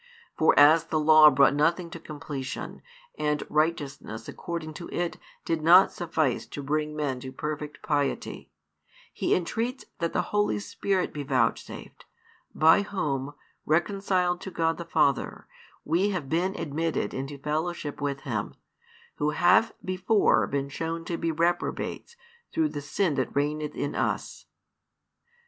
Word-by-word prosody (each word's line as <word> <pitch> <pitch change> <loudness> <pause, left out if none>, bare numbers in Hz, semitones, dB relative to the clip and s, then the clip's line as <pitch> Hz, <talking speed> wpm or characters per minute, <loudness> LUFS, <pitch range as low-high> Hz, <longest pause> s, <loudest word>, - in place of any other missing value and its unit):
For 160 - +3
as 155 +3 +7
the 160 -1 -1
Law 155 0 +8
brought 140 0 +4
nothing 170 +4 +1
to 165 - -7
completion, 145 -4 -6 0.4
and 150 -1 0
righteousness 145 -7 -1
according 165 -2 -5
to 170 +2 -8
it 175 -1 -2 0.3
did 165 -1 -1
not 175 +4 +7
suffice 160 -7 -1
to 145 - -7
bring 150 +2 -1
men 140 -4 -2
to 130 +1 -7
perfect 150 +1 -5
piety, 145 -2 -2 0.6
He - - +1
entreats 230 +9 -2
that 170 -1 -1
the 180 - 0
Holy 205 - +2
Spirit 180 - -2
be 150 - -4
vouchsafed, 130 -5 -2 0.5
by 160 +5 +6
Whom, 145 -8 -3 0.3
reconciled 180 +1 +1
to - - -6
God 165 -2 0
the 170 - -5
Father, 150 -4 0 0.4
we 175 +6 +2
have 180 -8 -3
been 180 +5 0
admitted 165 +1 -2
into 135 +2 -5
fellowship 150 +1 -3
with 140 -1 -2
Him, 110 -7 -3 0.6
who 150 - +1
have 180 +8 +4
before 185 +3 +2
been 140 0 -2
shown 165 +3 -4
to 170 - -2
be 165 0 -1
reprobates 170 - -2 0.4
through 320 -1 +1
the 145 - -5
sin 155 +4 0
that 130 - -2
reigneth 150 +1 -1
in 145 - -2
us. - - -3
155 Hz, 140 wpm, -27 LUFS, 145-175 Hz, 0.6 s, Law